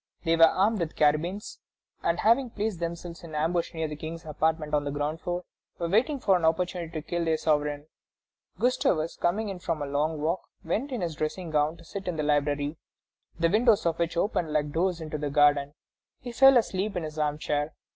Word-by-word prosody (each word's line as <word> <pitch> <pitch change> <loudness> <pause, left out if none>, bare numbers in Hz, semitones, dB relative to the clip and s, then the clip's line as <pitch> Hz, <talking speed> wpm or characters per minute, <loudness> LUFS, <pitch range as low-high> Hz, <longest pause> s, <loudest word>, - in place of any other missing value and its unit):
They 165 -1 +3
were 165 0 +8
armed 205 +5 +2
with 165 -2 -3
carbines, 160 +8 0 0.4
and, 170 - 0
having 235 +4 +3
placed 215 -4 -3
themselves 170 0 -5
in 160 -2 -8
ambush 165 +3 0
near 160 -1 -1
the 150 - -6
King's 160 +2 -7
apartment 155 0 -1
on 145 -1 +2
the 145 - -3
ground 145 +3 -2
floor, 175 0 -3 0.3
were 170 - -2
awaiting 235 - +2
an 185 -3 +4
opportunity 170 +1 0
to 155 -1 -5
kill 175 0 -1
their 160 -1 +1
sovereign. 150 -2 0 0.7
Gustavus 170 -10 +1
coming 205 +5 0
in 190 -2 -5
from 170 -3 -2
a 145 - -2
long 150 +3 -1
walk, 165 +5 0 0.2
went 220 - -2
in 245 -5 -3
his 170 -2 -2
dressing 155 +3 -4
gown 150 +2 +1
to 170 - -16
sit 195 +3 -7
in 180 - -1
the 155 - -2
library, 145 0 0 0.6
the 165 - +4
windows 215 +3 +3
of 165 -1 0
which 170 0 -1
opened 170 -4 0
like 150 -1 0
doors 175 +2 0
into 155 -1 -4
the 145 0 -2
garden. 145 0 +3 0.4
He 245 - -7
fell 270 +2 +7
asleep 200 -2 0
in 175 - -2
his 155 0 -6
armchair. 150 0 -1
165 Hz, 200 wpm, -27 LUFS, 150-185 Hz, 0.7 s, were